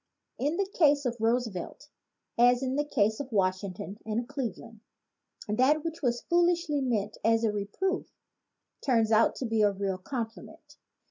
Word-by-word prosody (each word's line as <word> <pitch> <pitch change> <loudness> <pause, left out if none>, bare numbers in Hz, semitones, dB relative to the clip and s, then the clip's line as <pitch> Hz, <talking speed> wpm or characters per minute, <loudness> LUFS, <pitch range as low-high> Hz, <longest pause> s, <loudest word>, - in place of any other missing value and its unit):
In 295 +6 0
the 395 - +1
case 295 -7 +3
of 240 -1 -1
Roosevelt, 230 +2 -1 0.5
as 245 +2 +4
in 260 0 -1
the 295 - +1
case 220 -7 +1
of 275 -2 -6
Washington 195 0 -1
and 225 +2 -2
Cleveland, 235 -5 -5 0.7
that 260 +8 +2
which 330 0 -5
was 240 -3 0
foolishly 345 -4 +1
meant 215 -5 -1
as 225 +1 +3
a 220 - +2
reproof 210 - -2 0.8
turns 230 -5 +2
out 220 +1 +4
to 260 - -4
be 225 -2 +1
really 200 -1 +1
a 185 - -7
compliment. 230 +5 -7
240 Hz, 150 wpm, -29 LUFS, 215-285 Hz, 0.8 s, as